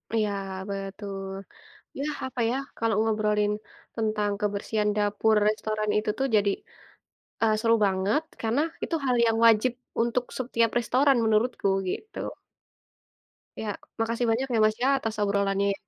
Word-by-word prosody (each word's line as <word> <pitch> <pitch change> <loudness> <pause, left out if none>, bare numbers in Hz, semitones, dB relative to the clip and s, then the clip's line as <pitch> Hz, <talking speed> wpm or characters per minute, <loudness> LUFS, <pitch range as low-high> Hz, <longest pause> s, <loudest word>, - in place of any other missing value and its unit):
Iya 215 -2 +1 0.4
betul, 195 0 -5 0.7
yah 295 +2 -2
apa 260 -1 -6
ya, 245 - 0 0.2
kalau 225 -2 +1
ngobrolin 210 -1 +1 0.4
tentang 215 -2 0
kebersihan 210 +1 0
dapur 210 +1 +2
restoran 215 0 -1
itu 210 0 0
tuh 270 - +2
jadi, 200 -1 +4 0.9
eee, 220 -1 +4
seru 230 0 +4
banget 195 +9 +1 0.2
karena 230 +5 +1 0.2
itu - - -3
hal 250 -1 +2
yang 225 0 +2
wajib 230 +2 +5 0.3
untuk 240 +1 0
setiap 230 -3 +1
restoran 260 +4 +3
menurutku 220 -1 +1 0.2
gitu. 435 - -6 1.4
Ya 220 - -4 0.3
makasih 230 +2 0
banyak 250 +4 +1
ya 225 - +3
Mas 215 0 +1
ya 270 - +4
atas 225 -3 -3
obrolan 200 -1 +1
yang 200 0 +2
220 Hz, 135 wpm, -27 LUFS, 205-235 Hz, 1.4 s, wajib